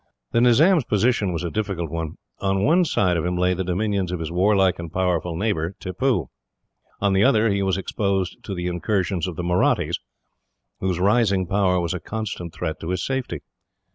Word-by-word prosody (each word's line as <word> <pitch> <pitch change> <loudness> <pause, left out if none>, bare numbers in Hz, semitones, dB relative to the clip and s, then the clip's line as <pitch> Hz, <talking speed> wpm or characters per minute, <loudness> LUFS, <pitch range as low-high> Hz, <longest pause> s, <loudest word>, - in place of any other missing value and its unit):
The 115 - +3
Nizam's 150 +8 +5
position 105 -2 +1
was 85 0 -3
a 85 - -3
difficult 95 -7 -3
one. 80 -2 -4 0.2
On 95 0 0
one 175 +4 +4
side 90 - +1
of 80 - -1
him 90 0 -1
lay 90 +1 +2
the 95 +1 -2
dominions 95 0 -1
of 90 - -3
his 80 0 -4
warlike 95 0 +3
and 85 -2 -6
powerful 90 -2 0
neighbour, 95 -3 -1
Tippoo. 95 - -1 0.7
On 100 -1 +2
the 95 +1 +4
other 115 -4 +4
he 100 0 0
was 95 -1 +1
exposed 95 -1 -2
to 100 - -4
the 90 0 -4
incursions 90 0 -1
of 90 - -5
the 90 - -4
Mahrattis, 90 +1 +1 0.8
whose 95 -2 -1
rising 100 -1 +3
power 95 0 +2
was 85 0 -1
a 90 - -3
constant 100 -2 -5
threat 80 0 -4
to 80 - -6
his 90 -1 -1
safety. 130 -1 -3
95 Hz, 190 wpm, -23 LUFS, 90-105 Hz, 0.8 s, Nizam's